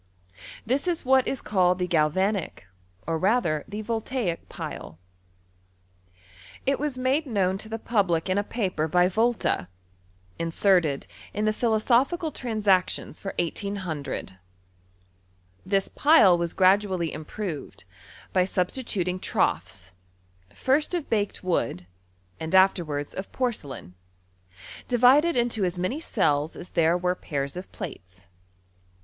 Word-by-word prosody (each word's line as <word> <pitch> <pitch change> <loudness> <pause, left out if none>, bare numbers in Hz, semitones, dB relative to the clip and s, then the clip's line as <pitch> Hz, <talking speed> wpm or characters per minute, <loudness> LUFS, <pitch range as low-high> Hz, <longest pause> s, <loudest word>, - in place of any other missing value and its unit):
This 270 +9 0
is 340 -5 -1
what 265 0 +4
is 270 - -3
called 180 -3 +2
the 180 - 0
Galvanic, 180 - 0 0.4
or 165 0 -1
rather 185 -6 +1
the 210 +1 -5
Voltaic 225 -4 -3
pile. 80 - -7 1.7
It 275 +1 +1
was 290 -2 -2
made 265 +4 +1
known 195 -5 0
to 220 - -6
the 225 - -3
public 195 -8 0
in 185 +2 +1
a - - 0
paper 185 -8 -2
by 180 +3 +4
Volta, 220 - 0 0.7
in 165 0 -1
serted 165 -5 +2 0.3
in 210 +1 0
the 215 - +2
Philosophical 245 +9 +1
Transactions 210 -8 0
lor 195 - -5
180CK 170 - -3 1.3
Tins 195 -1 +2
pile 290 - +6
was 170 -1 -2
gradually 185 -3 +3
improved, 155 +1 -6 0.5
by 185 - +4
substituting 185 -1 -1
troughs, 95 - -1 0.6
first 295 +6 +1
of 335 -5 -4
baked 205 -4 -1
wood, 115 - -1 0.5
and 160 +3 -2
afterwards 165 -6 +2
cf 190 - -6
porcelain, 150 - -3 0.9
divided 260 +7 +5
into 235 -3 +2
as 180 -1 -1
many 185 - -1
cells 150 - 0
as 180 - -9
there 165 +1 +3
were 180 0 0
pairs 140 -5 -4
of 180 +1 -8
(^ates. 90 - -9
190 Hz, 120 wpm, -26 LUFS, 165-230 Hz, 1.7 s, pile